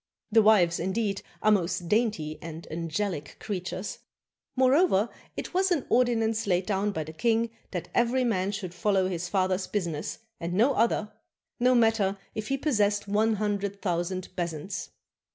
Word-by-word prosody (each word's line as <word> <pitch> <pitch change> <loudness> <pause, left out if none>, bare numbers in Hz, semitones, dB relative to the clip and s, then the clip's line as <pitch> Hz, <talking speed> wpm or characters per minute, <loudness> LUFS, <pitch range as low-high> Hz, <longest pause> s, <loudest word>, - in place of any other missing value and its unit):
The 225 +1 +6
wives, 195 -6 +4
indeed, 195 +2 -1 0.2
are 215 - +5
most 180 -3 +1
dainty 190 -8 0
and 165 -1 -8
angelic 165 -1 -3
creatures! 185 -1 -4 0.6
Moreover, 255 - +4 0.3
it - - -5
was 375 +1 +2
an 330 -8 +1
ordinance 225 -3 +2
laid 180 -1 +2
down 205 0 0
by 160 -5 -3
the 155 +1 -9
king 230 +6 +1 0.2
that 180 -3 -5
every 245 +2 +2
man 200 -5 +1
should 195 -4 -5
follow 190 +1 +2
his 175 -1 -3
father's 185 -1 +1
business 170 -7 -3 0.2
and 170 +1 -3
no 240 +8 +4
other, 215 -3 +1 0.5
no 250 +1 +4
matter 225 -4 +3 0.2
if 215 0 -4
he 275 - 0
possessed 210 -8 +1
one 215 +2 +2
hundred 200 -1 -2
thou 175 -4 +1
sand 185 +1 -4
bezants. 175 +2 -4
200 Hz, 155 wpm, -28 LUFS, 180-225 Hz, 0.6 s, The